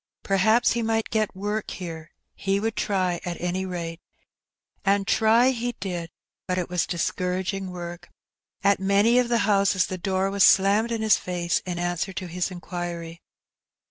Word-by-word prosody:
Perhaps 220 +5 +3
he 235 - 0
might 225 0 -1
get 215 -2 0
work 205 +2 -3
here; 165 -3 -7 0.2
he 195 0 -1
would 225 +1 -2
try, 185 -3 0
at 175 -1 -4
any 180 +2 -2
rate. 170 -2 -5 0.8
And 200 0 +2
try 230 +5 +4
he 245 -1 -3
did; 175 -4 -4 0.4
but 180 - -1
it 180 - -2
was 180 -1 0
discouraging 185 +2 -2
work. 175 -1 -7 0.5
At 200 0 +4
many 200 +5 +4
of 245 -1 +1
the 240 - +3
houses 200 -3 +3
the 185 - -5
door 190 +1 0
was 200 -1 +3
slammed 205 +4 +5
in 225 -1 -1
his 215 - +4
face 175 -1 -1
in 175 -1 -3
answer 175 +1 -2
to 185 - -5
his 180 +1 -2
inquiry. 175 -2 -6
190 Hz, 165 wpm, -25 LUFS, 175-210 Hz, 0.8 s, slammed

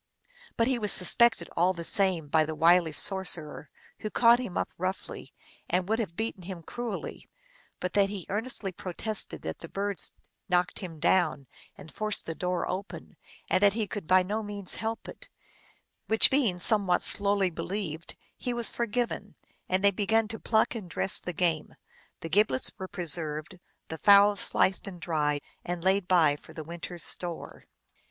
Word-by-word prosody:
But 230 - +2
he 255 0 0
was 210 -2 +2
suspected 225 0 +4
all 180 +3 +2
the 170 -2 -7
same 185 -4 +3
by 155 +2 +2
the 155 0 -5
wily 170 +1 +4
sorcerer, 160 -4 -1 0.3
who 215 - -5
caught 235 +2 +4
him 245 -8 -5
up - - -2
roughly, 185 +2 -5 0.4
and 180 0 0
would 220 +2 0
have 195 -7 -4
beaten 220 -3 -4
him 180 -1 -8
cruelly 240 +3 -7 0.5
but 180 - -4
that 200 -1 +3
he 195 -4 -6
earnestly 210 -1 -3
pro 180 0 -8
tested 215 +3 -2
that 80 - -5
the - - -10
birds 200 -1 +3 0.4
knocked 180 0 0
him 170 -5 -8
down 160 -5 +1 0.3
and 155 - -13
forced 215 -1 +1
the 165 - -4
door 180 +1 -3
open, 190 +3 -7 0.3
and - - +1
that 200 -1 +5
he 220 0 -2
could 205 -5 -7
by 185 0 +4
no 210 +4 -3
means 205 -3 -4
help 225 0 -5
it: - - -11 0.8
which 220 - +6
being 250 -10 +1
somewhat 190 -1 +5
slowly 200 -2 +4
believed, 170 -2 -5 0.2
he 245 -1 -4
was 235 -1 +3
for 235 - -2
given, 240 +2 -3 0.3
and 185 +1 0
they 200 - +5
began 215 +3 +1
to 225 - -6
pluck 220 +1 +1
and 210 -7 -8
dress 190 +3 +3
the 180 - -5
game. 165 -2 -1 0.5
The 165 - -6
giblets 180 -7 +2
were 190 - -5
preserved, 165 -2 -2 0.3
the 160 - -7
fowls 200 +1 +6
sliced 190 +2 +1
and 180 -3 -8
dried 150 -3 -1 0.2
and 175 -1 -5
laid 190 0 +1
by 160 -6 +3
for - - -16
the 155 - -7
winter 170 +2 -8
s 170 - -5
store. 175 -2 -3
190 Hz, 175 wpm, -28 LUFS, 170-210 Hz, 0.8 s, which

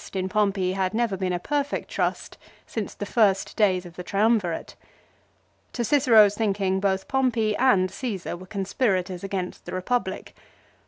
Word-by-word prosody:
His - - -12
trust - - -14
in 190 0 -1
Pompey 195 -2 +1
had 190 +1 -1
never 230 -4 +1
been 185 -1 -2
a 180 - 0
perfect 285 +9 -2
trust - - -2 0.3
since 220 -3 -5
the 205 - -5
first 200 -3 +2
days 185 -4 +2
of 175 0 -12
the 180 - -5
Triumvirate. 200 -3 0 1.0
To 240 - -2
Cicero's 225 -6 +5
thinking 195 -3 0
both 190 -1 0
Pompey 240 -5 +1
and 200 -8 +3
Caesar 210 -10 -4
were 185 +2 -11
conspirators 190 -2 -1
against 190 -2 -4
the - - -7
Eepublic. 235 +7 -2
200 Hz, 160 wpm, -25 LUFS, 185-225 Hz, 1.0 s, Cicero's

